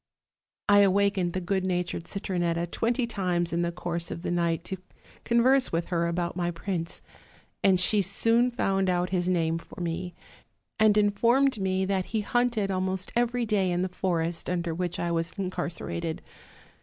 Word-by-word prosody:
I 205 0 +6
awakened 200 -2 +3
the 185 - -1
good 190 +1 -1
natured 180 -2 -2
Cit 195 - -4
ronetta 170 -2 0
twenty 235 +2 0
times 180 -6 -1
in 170 - +1
the 170 0 0
course 170 -1 -3
of 170 - -6
the - - -2
night 170 -1 0
to 190 - -5 0.5
con 235 0 +3
verse 265 +1 +4
with 165 0 -1
her 170 -2 +1
about 170 0 -2
my 175 -1 -1
prince; 170 -1 -4 0.6
and 190 -2 +5
she 205 +3 +4
soon 230 +6 +2
found 195 -5 0
out 180 0 0
his 180 -1 +1
name 165 -2 +1
for - - -13
me, 175 0 -3 0.6
and 215 -1 +5
informed 230 +5 +3
me 190 0 0
that 190 -1 0
he 220 -2 -2
hunteo. 235 -3 +1
almost 185 0 -1
every 240 0 +1
day 205 -4 +1
in 175 0 0
the 185 - -1
forest 170 -2 -1
under 175 -2 -1
which 175 0 -2
I 170 - -1
was 165 0 -1
incarcerated. 175 -3 -3
185 Hz, 175 wpm, -27 LUFS, 175-200 Hz, 0.6 s, I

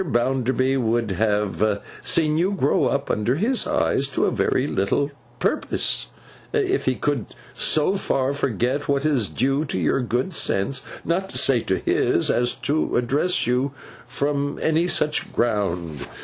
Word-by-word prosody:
Bounderby 130 -1 +1
would 115 -3 0
have 105 +1 0 0.2
seen 155 -2 +2
you 180 +5 +1
grow 145 -7 +2
up 140 0 0
under 105 +5 0
his 230 - +1
eyes, 295 - +1
to 140 - 0
very - - +1
little 140 +9 0 0.3
purpose, - - 0 0.5
if 395 -3 +1
he 130 - +1
could 145 -5 -1 0.3
so 155 +5 +2
far 135 -8 0
forget 130 +1 -1
what 140 +1 +1
is 135 -9 +1
due 135 +3 0
to 115 - -3
your 85 - +1
good 125 +9 -1
sense, 130 -1 +1 0.2
not 185 +4 -1
to - - -4
say 130 -3 +4
to 95 -4 -1
his, - - +1
as 120 0 +1
to 150 +2 -1
address 140 +9 +1
you 125 +3 0 0.3
from 145 0 -1
any 160 +2 +1
such 150 -3 +1
ground. 90 -9 -1
135 Hz, 150 wpm, -23 LUFS, 115-150 Hz, 0.5 s, say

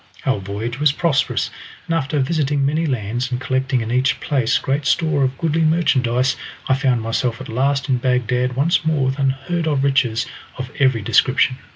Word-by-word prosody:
Our 130 -6 +1
voyage 105 +6 -5
was 150 -1 +4
prosperous, 150 -1 0 0.3
and 170 - -2
after 150 -2 -1
visiting 145 0 +1
many 155 +4 0
lands, 120 0 -2
and 125 - -1
collecting 130 -2 0
in 110 +1 -4
each 125 +1 +1
place 130 -5 +1
great 135 +1 -1
store 155 -4 +2
of 130 0 -1
goodly 165 0 0
merchandise, 135 -6 +2 0.3
I - - +3
found 130 -4 +1
myself 115 +1 -1
at - - -8
last 135 +4 0
in 130 -3 +1
Bagdad 125 0 0
once 150 +7 +2
more 155 -4 +1
with 130 +2 -1
unheard 135 +5 -1
of 140 -3 +1
riches 130 -5 +1 0.3
of 130 +1 -6
every 130 -6 +2
description. 130 +4 +2
130 Hz, 180 wpm, -20 LUFS, 125-145 Hz, 0.3 s, was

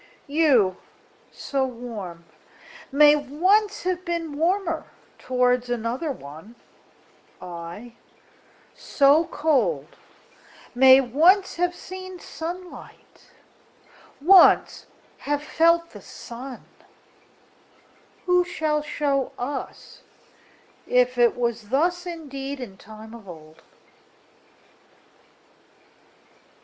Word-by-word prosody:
You, 275 - +2 0.5
so 275 -1 -2
warm, 225 -9 -7 0.7
may 295 +1 +6
once 370 +9 +1
have 365 0 -2
beenWarmer 335 +1 -2 0.3
towards 250 -1 0
another 245 +6 -2
one:I, 175 - -12 0.8
so 290 +3 +3
cold, 250 - 0 0.8
may 260 +1 +7
once 335 - +3
have 355 0 0
seenSunlight, 365 -1 -9 0.9
once 365 +6 +5 0.3
have 290 0 -2
felt 335 +2 +2
the - - -12
sun:Who 270 +7 -7
shall 310 -4 -1
show 285 -2 -2
us 270 +3 -7 0.9
if 250 0 +2
it 240 -1 +3
wasThus 265 - -1
indeed 280 -4 -7
in 225 -7 -8
time 220 +3 -13
of 220 -5 -12
old? 155 -2 -13
275 Hz, 70 wpm, -24 LUFS, 235-335 Hz, 0.9 s, may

